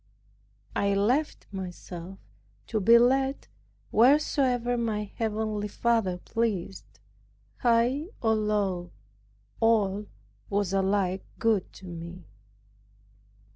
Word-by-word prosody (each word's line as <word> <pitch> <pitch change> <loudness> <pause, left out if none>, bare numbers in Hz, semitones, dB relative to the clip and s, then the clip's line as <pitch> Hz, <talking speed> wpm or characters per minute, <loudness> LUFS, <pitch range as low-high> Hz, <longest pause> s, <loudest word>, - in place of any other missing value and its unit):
I 200 0 +1
left 250 +10 +1
myself 185 -1 -7 0.5
to 220 - -1
be 230 +4 +7
led 265 +3 +2 0.4
wheresoever 250 -1 +3
my 225 -3 -1
heavenly 215 -1 -2
Father 220 -4 +1
pleased, 170 - -3 0.6
high 240 +5 +2
or 225 -1 +2
low; 205 -5 0 0.7
all 210 -3 +2 0.4
was 200 -1 0
alike 195 -1 +1
good 220 -5 +1
to 190 - -13
me. 170 0 -8
210 Hz, 90 wpm, -27 LUFS, 190-235 Hz, 0.7 s, be